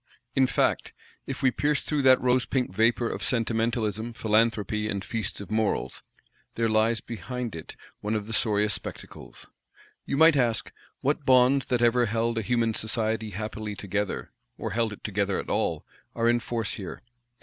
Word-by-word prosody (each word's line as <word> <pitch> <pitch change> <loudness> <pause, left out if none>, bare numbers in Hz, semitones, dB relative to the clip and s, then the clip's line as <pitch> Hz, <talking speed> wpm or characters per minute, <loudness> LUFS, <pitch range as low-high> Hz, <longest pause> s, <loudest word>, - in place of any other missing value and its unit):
In 130 -1 +4
fact, - - 0 0.3
if 135 +1 -5
we 130 - +5
pierce 145 +3 0
through 150 -2 0
that 130 -1 +6
rosepink 125 -3 +1
vapour 115 +3 +2
of - - -4
Sentimentalism, 115 -1 -1
Philanthropy, 110 -1 +1
and 100 -2 -3
Feasts 115 -2 -3
of 100 +1 -8
Morals, 110 -1 -1 0.5
there 115 0 +1
lies 110 0 +2
behind 120 0 -5
it 80 - -9 0.2
one 105 +1 -2
of 105 -1 -2
the 115 - -6
sorriest 105 -1 +2
spectacles. - - -9 0.6
You 140 - -1
might 160 0 +7
ask, 120 -5 +1 0.3
What 145 +2 0
bonds 130 +1 +5
that 120 -1 0
ever 120 0 +4
held 115 +1 0
a - - -1
human 115 +1 +1
society 110 0 0
happily 105 +1 -5
together, 100 0 -3 0.3
or - - -4
held 115 +1 0
it 105 - -10
together 100 -1 0
at - - -5
all, - - 0 0.3
are 115 0 +1
in 120 0 +4
force 115 -2 -3
here? 95 - -7
115 Hz, 165 wpm, -27 LUFS, 105-125 Hz, 0.6 s, might